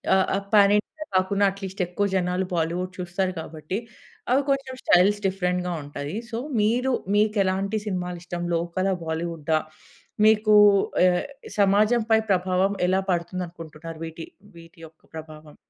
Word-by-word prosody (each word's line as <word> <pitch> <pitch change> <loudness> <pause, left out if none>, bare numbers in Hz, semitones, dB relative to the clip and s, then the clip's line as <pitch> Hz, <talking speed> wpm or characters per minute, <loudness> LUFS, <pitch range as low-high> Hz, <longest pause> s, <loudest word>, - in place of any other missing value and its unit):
ఆహ్, 190 - +3
ఆహ్, 195 0 -3
pan 200 -1 +6
India 310 +9 -5
కాకున్నా 195 +2 +2
అట్లీస్ట్ 195 -1 -6
ఎక్కువ 180 +4 -1
జనాలు 180 0 0
బాలీవుడ్ 175 +2 -1
చూస్తారు 180 +1 -2
కాబట్టి 160 +3 -5 0.5
అవి 265 +2 +4
కొంచెం 275 -1 -1
స్టైల్స్ 200 +4 +4
డిఫరెంట్‌గా 180 -1 -1
ఉంటాయి. 145 +3 -6 0.2
సో 225 - -3 0.2
మీరు 245 +5 +1 0.2
మీకు 210 0 +2
ఎలాంటి 195 +3 -1
సినిమాలు 180 -2 -3
ఇష్టం? 175 -1 -5
లోకలా? 175 +3 -1
బాలీవుడా? 160 -1 -1 0.7
మీకు 215 0 +5 0.5
ఆహ్, 180 -1 +2 0.3
సమాజం 210 +4 +4
పై 220 - +6
ప్రభావం 185 +1 +1
ఎలా 190 +1 +2
పడుతుంది 175 +1 -2
అనుకుంటున్నారు 165 -1 -10
వీటి 165 0 -8 0.3
వీటి 165 0 -16
యొక్క 155 0 -25
ప్రభావం? 155 -1 -10
185 Hz, 140 wpm, -24 LUFS, 170-200 Hz, 0.7 s, pan